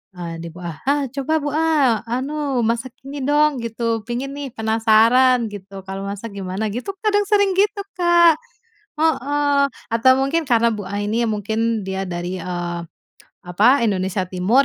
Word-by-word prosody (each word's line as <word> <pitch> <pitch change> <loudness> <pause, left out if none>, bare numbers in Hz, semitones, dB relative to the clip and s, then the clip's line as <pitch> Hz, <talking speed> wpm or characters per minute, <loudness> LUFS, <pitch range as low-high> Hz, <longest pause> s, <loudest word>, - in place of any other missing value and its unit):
Ah 170 -2 -6
di 170 - -6
bu 175 +2 -12
A, 165 -3 -6
"Ah 285 0 +2
coba 280 +4 0
bu 290 - -2
A, 300 -8 +2
anu 270 +1 -1
masak 235 +2 -2
ini 280 +1 -6
dong, 295 0 +2
gitu. 230 -1 -2
Pengen 255 +3 -3
nih, 285 -1 -5
penasaran 225 +3 +4
gitu, 195 -1 -9
kalau 195 0 -5
masak 205 +2 -6
gimana 195 +2 -4
gitu," 315 +12 -5
kadang 415 -1 +3
sering 405 -2 +3
gitu 405 +1 +1 0.2
Kak 345 -2 +5 0.6
heeh, 290 -2 +2 0.2
atau 230 +2 +4
mungkin 305 +5 +1
karena 235 -4 +3
bu 210 -3 -2
A 200 +2 -4
ini 215 +3 0
mungkin 220 +1 -1
dia 190 0 -2
dari, 175 0 -4
eee, 175 -1 -4 0.7
apa, 215 +10 +4
Indonesia 190 -2 0
timur 195 +9 +3
230 Hz, 160 wpm, -20 LUFS, 200-285 Hz, 0.7 s, Kak